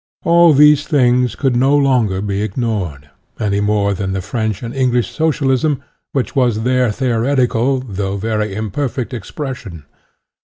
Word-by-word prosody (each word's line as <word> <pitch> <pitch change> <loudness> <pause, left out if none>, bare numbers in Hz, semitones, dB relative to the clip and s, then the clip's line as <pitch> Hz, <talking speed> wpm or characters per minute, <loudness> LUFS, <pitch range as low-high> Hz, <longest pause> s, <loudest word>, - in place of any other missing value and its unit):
All 170 -1 +5
these 150 +1 +5
things 125 -4 +2
could 135 -4 0
no 135 +4 +3
longer 120 -9 +1
be 100 -1 -2
ignored, 95 - -3 0.3
any 100 -2 0
more 105 -1 +1
than 95 0 -3
the 95 - -2
French 110 +1 -3
and 115 +1 -5
English 125 -5 0
Socialism, 145 -2 0 0.3
which 135 0 -2
was 120 -5 +1
their 125 -1 +2
theoretical, 125 +1 0
though 100 -4 -4
very 105 -1 -2
imperfect, 120 +4 -3
ex 110 -6 -7
pression. 130 - -7
120 Hz, 145 wpm, -17 LUFS, 105-135 Hz, 0.3 s, All